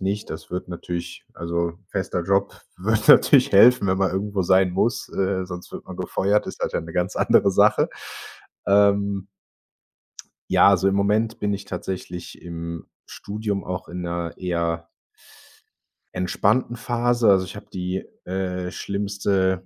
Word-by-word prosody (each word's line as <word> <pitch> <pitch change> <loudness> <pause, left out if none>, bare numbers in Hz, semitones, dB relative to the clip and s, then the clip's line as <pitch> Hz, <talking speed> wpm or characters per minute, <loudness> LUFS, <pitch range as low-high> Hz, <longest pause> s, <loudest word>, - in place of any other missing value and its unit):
nicht. 100 +2 -3
Das 80 - -8
würde 90 0 -5
natürlich 85 0 -6
also, 85 0 -3
fester 95 -3 -2
Job 100 +3 0 0.2
würde 105 +4 0
natürlich 140 -1 +5
helfen, 115 +2 +7
wenn 95 0 +1
man 95 -1 +2
irgendwo 100 0 -1
sein 95 +1 +4
muss, 115 +6 0
äh, 95 -1 -1
sonst 90 -1 -9
wird - - -8
man - - -8
gefeuert 100 +2 0
ist - - -7
das - - -1
ja - - 0
'ne 80 0 -9
ganz 90 +1 -1
andere - - +4
Sache. - - +4 0.8
Ähm 100 -1 +3 1.3
Ja, - - +6
also, 95 -1 +4
im 95 - 0
Moment 110 +3 +1
bin 100 -1 0
ich 100 - -5
tatsächlich 90 -3 -6
im 85 -1 -7 0.2
Studium 105 -1 -4
auch 90 0 -5
in 90 +1 -6
'ner 85 -1 -3
eher 85 -2 -2 1.3
entspannten 105 +7 +1
Phase, 120 -1 +1
also, 95 -2 +4
ich 90 - -10
habe - - -10
die, 90 0 -3 0.2
äh, 90 -1 -3
schlimmste 100 -2 -1
95 Hz, 150 wpm, -23 LUFS, 90-100 Hz, 1.3 s, helfen